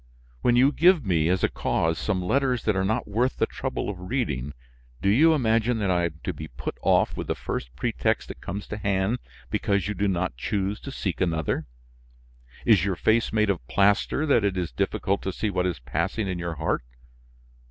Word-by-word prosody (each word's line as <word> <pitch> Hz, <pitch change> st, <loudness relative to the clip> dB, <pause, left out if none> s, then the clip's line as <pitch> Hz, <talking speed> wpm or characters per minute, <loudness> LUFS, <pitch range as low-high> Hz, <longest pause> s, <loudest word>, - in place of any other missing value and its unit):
When 120 Hz, -, +3 dB
you 130 Hz, +3 st, +5 dB
give 170 Hz, -, +4 dB
me, 85 Hz, -4 st, +2 dB
as 90 Hz, 0 st, +1 dB
a -, -, +5 dB
cause, 80 Hz, 0 st, 0 dB
some 95 Hz, -4 st, -1 dB
letters 130 Hz, +4 st, +1 dB
that 110 Hz, -, +1 dB
are 95 Hz, -, +1 dB
not 110 Hz, +5 st, 0 dB
worth 120 Hz, +6 st, 0 dB
the -, -, +3 dB
trouble -, -, -4 dB
of 100 Hz, -3 st, -4 dB
reading, 75 Hz, -, -2 dB, 0.4 s
do 100 Hz, -, +1 dB
you 155 Hz, +10 st, +5 dB
imagine 115 Hz, -2 st, +2 dB
that 100 Hz, -4 st, 0 dB
I 90 Hz, -1 st, +2 dB
am 80 Hz, -2 st, -5 dB
to 95 Hz, -, -2 dB
be 75 Hz, +1 st, -7 dB
put -, -, -6 dB
off -, -, +3 dB
with -, -, -5 dB
the -, -, 0 dB
first -, -, -5 dB
pretext -, -, -1 dB
that -, -, -9 dB
comes 100 Hz, +3 st, -5 dB
to 105 Hz, -, -4 dB
hand 100 Hz, +3 st, 0 dB, 0.3 s
because 100 Hz, -1 st, 0 dB
you 105 Hz, -, -1 dB
do 100 Hz, +1 st, 0 dB
not 90 Hz, -6 st, -1 dB
choose 100 Hz, -, -2 dB
to 140 Hz, -, -8 dB
seek 95 Hz, -9 st, -3 dB
another? 80 Hz, -4 st, 0 dB, 1.0 s
Is 105 Hz, -7 st, +5 dB
your 100 Hz, -1 st, 0 dB
face 110 Hz, +6 st, +2 dB
made 110 Hz, -2 st, +3 dB
of 80 Hz, -11 st, -5 dB
plaster 100 Hz, +9 st, +2 dB
that 140 Hz, -7 st, +3 dB
it 100 Hz, -2 st, 0 dB
is 90 Hz, -6 st, -2 dB
difficult 95 Hz, +10 st, -1 dB
to 95 Hz, -, -2 dB
see 105 Hz, +3 st, -2 dB
what 90 Hz, -1 st, 0 dB
is 90 Hz, -, -2 dB
passing 85 Hz, -, -2 dB
in 90 Hz, -2 st, -3 dB
your 85 Hz, -1 st, -3 dB
heart? -, -, -1 dB
100 Hz, 205 wpm, -26 LUFS, 90-110 Hz, 1.0 s, you